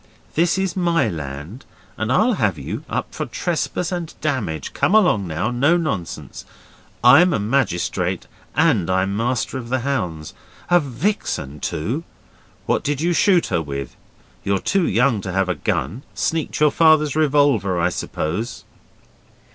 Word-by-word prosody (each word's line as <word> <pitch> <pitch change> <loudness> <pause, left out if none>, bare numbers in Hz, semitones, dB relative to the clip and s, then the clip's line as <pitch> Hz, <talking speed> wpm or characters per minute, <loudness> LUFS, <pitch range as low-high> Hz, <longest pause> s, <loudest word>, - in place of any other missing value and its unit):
This 170 +3 +2
is 190 -2 -1
my 170 -2 +2
land 75 - -7 0.3
and 110 +2 -2
I'll 220 - +3
have 110 - 0
you 70 - -5
up - - -3
for - - -4
trespass 180 - -2
and 175 -3 -3
damage. 115 - -2
Come 205 - +2
along 180 - +4
now, 85 +9 -2
no 140 +8 +3
nonsense! 110 - -4 0.6
I'm 160 +9 +7
a - - +1
magistrate 110 -4 0 0.3
and 85 - +3
I'm 95 +1 +1
Master 120 +3 -1
of 120 -2 -8
the 130 0 0
Hounds. 90 - -3 0.4
A 175 - +7
vixen, 135 - -2
too! 115 - -2 0.6
What - - 0
did 145 -1 -1
you 175 +3 +1
shoot 175 +1 +4
her 85 - +2
with? 70 -4 -6 0.5
You're 100 0 +1
too 190 - +1
young 120 -3 +2
to 95 - -5
have 95 0 0
a - - +2
gun. 85 - -2
Sneaked 160 -2 -1
your 150 -1 +5
Father's 155 -3 +4
revolver, 140 - +2
I 85 +1 +2
suppose? 90 +7 -4
125 Hz, 150 wpm, -21 LUFS, -, 0.6 s, I'm